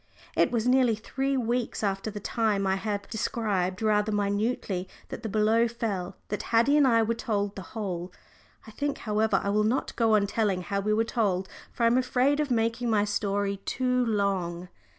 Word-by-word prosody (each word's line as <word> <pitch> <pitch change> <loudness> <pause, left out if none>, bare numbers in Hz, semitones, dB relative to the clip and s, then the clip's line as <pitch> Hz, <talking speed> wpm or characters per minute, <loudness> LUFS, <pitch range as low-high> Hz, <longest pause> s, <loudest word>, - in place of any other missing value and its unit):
It - - +4
was 235 -2 -1
nearly 250 -3 +4
three 270 +5 -2
weeks 240 -1 -1
after 195 +1 -1
the 210 -1 -6
time 210 -2 0
I 190 0 +2
have 200 0 -3
described 210 -4 -1
rather 210 0 +2
minutely 205 -2 -1 0.2
that - - -6
the 225 - -4
blow 220 +3 +3
fell, 205 -6 -3
that 210 - -2
Haddie 235 +5 +3
and 290 -2 +5
I 230 -2 +4
were 225 +1 0
told 205 -3 -2
the 195 - -6 0.2
whole. 180 -4 -3 0.5
I 220 - -11
think, 285 +5 -2
however, 215 0 +1
I 200 - -1
will 210 +1 +2
not 230 +5 0
go 225 -2 +3
on 205 -1 +3
telling 200 -3 0
how 200 +2 -2
we 210 +2 -1
were 220 +1 +3
told, 200 -5 0 0.2
for 235 - -3
I - - +6
am 235 +2 +4
afraid 255 +3 +2
of 300 -2 0
making 230 0 0
my 210 -2 +3
story 200 -1 -1
too 250 +5 0
long. 190 -5 -1
215 Hz, 190 wpm, -27 LUFS, 200-235 Hz, 0.5 s, I